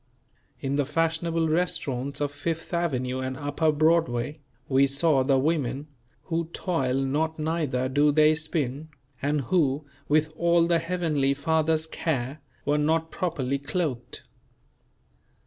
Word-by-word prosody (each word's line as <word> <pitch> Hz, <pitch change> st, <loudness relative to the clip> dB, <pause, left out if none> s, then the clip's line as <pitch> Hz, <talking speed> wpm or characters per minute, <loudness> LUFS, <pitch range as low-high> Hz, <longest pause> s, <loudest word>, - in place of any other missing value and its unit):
In 140 Hz, +1 st, -1 dB
the 145 Hz, -, +2 dB
fashionable 165 Hz, +2 st, 0 dB
restaurants 140 Hz, -5 st, -1 dB
of 145 Hz, -1 st, 0 dB
Fifth 165 Hz, +4 st, -4 dB
Avenue 130 Hz, -7 st, -1 dB
and 130 Hz, 0 st, -3 dB
Upper 145 Hz, +2 st, +1 dB
Broadway, 155 Hz, -3 st, +1 dB, 0.3 s
we 135 Hz, 0 st, +4 dB
saw 140 Hz, 0 st, +3 dB
the 135 Hz, 0 st, +3 dB
women 140 Hz, -1 st, -1 dB, 0.3 s
"who 165 Hz, 0 st, -1 dB
toil 135 Hz, -9 st, -1 dB
not 145 Hz, +4 st, 0 dB
neither 155 Hz, -5 st, -1 dB
do 145 Hz, +3 st, +3 dB
they 155 Hz, +1 st, +5 dB
spin," 155 Hz, -2 st, -2 dB, 0.3 s
and 145 Hz, +1 st, +1 dB
who, 145 Hz, 0 st, +1 dB, 0.2 s
with 155 Hz, +1 st, +2 dB
all 170 Hz, 0 st, +3 dB
the 170 Hz, -1 st, +2 dB
Heavenly 160 Hz, -5 st, 0 dB
Father's 160 Hz, +1 st, +1 dB
care, 140 Hz, -3 st, -3 dB, 0.2 s
were 145 Hz, +1 st, +2 dB
not 160 Hz, +2 st, +1 dB
properly 140 Hz, -7 st, -1 dB
clothed. 140 Hz, -5 st, -3 dB
150 Hz, 130 wpm, -26 LUFS, 135-160 Hz, 0.3 s, they